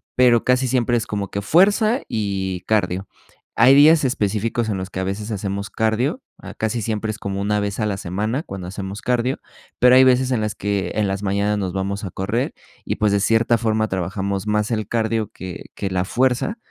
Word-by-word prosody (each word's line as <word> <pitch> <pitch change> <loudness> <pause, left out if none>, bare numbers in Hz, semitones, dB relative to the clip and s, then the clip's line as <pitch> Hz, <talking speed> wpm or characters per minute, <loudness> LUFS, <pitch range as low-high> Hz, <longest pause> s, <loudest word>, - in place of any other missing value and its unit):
pero 120 -2 +4
casi 125 +1 +2
siempre 120 -1 +1
es 115 - -3
como 100 -2 -3
que 100 - -3
fuerza 205 - +3
y 95 -5 -2
cardio. 95 -3 0 0.5
Hay 135 - +6
días 150 0 +6
específicos 110 -1 -1
en 100 - -1
los 95 0 -5
que 95 - -5
a - - -2
veces 105 +3 -4
hacemos 100 0 -3
cardio. 120 - 0 0.2
Ah, - - -10
casi 110 +1 -2
siempre 110 0 -2
es 110 - -7
como 100 -2 -4
una 105 +1 +1
vez 100 +2 -3
a 105 - +1
la 100 -2 -1
semana 105 - -2
cuando 95 -2 -7
hacemos 100 +1 -6
cardio, 125 +1 0 0.4
pero, 125 +1 +6
hay 130 - +8
veces 130 0 +4
en 115 -4 +1
las 105 -1 -2
que 100 -1 -2
en 105 -2 +1
las 95 +1 -3
mañanas 100 +1 0
nos 95 -3 -3
vamos 100 +2 -3
a 95 - -6
correr 105 +9 -2 0.3
y, - - -1
pues, 105 -1 +2
de 100 - +2
cierta 115 +3 +3
forma 110 -1 0
trabajamos 95 +1 -3
más 105 +1 0
el 110 -3 -1
cardio 110 -2 -1
que 95 -1 -8
que 100 - -3
la 95 -1 -1
fuerza, 130 - 0
105 Hz, 210 wpm, -21 LUFS, 100-120 Hz, 0.5 s, hay